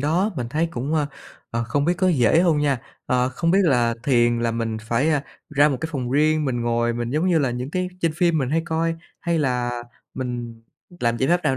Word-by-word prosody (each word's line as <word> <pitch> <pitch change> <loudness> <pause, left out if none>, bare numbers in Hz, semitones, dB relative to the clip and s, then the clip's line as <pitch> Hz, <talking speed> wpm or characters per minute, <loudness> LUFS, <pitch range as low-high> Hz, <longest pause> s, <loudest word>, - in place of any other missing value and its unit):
đó, 170 +9 +1
mình 120 -2 -3
thấy 160 +4 +1
cũng, 140 +5 -2
ờ, 150 -2 +1 0.4
ờ, 115 0 -1
không 140 +5 0
biết 175 - +3
có 185 0 +3
dễ 145 0 +4
hông 165 -4 +3
nha. 140 -4 +1 0.3
Ờ, 125 0 +2
Không 165 +6 -1
biết 190 - +4
là 120 -6 +3
thiền 120 -3 +3
là 115 - +1
mình 115 -1 -2
phải, 120 +8 +1
a, 145 -3 +1 0.3
ra 145 0 +4
một 140 - -1
cái 160 - -3
phòng 125 -3 -3
riêng 155 +2 +3
mình 125 -3 -1
ngồi 120 0 +1
mình 120 0 -3
giống 155 +6 +1
như 170 -3 +4
là 135 -4 +1
những 125 +3 -4
cái 185 +1 -1
trên 165 -2 +1
phim 170 -2 +2
mình 130 -3 -1
hay 160 +2 +1
coi 165 0 0 0.3
hay 170 -1 0
là 125 -4 -1 0.3
mình 120 -3 -5 0.4
làm 120 0 +1
giải 130 - 0
pháp 175 +1 +3
nào 135 -2 +2
135 Hz, 240 wpm, -23 LUFS, 120-160 Hz, 0.4 s, dễ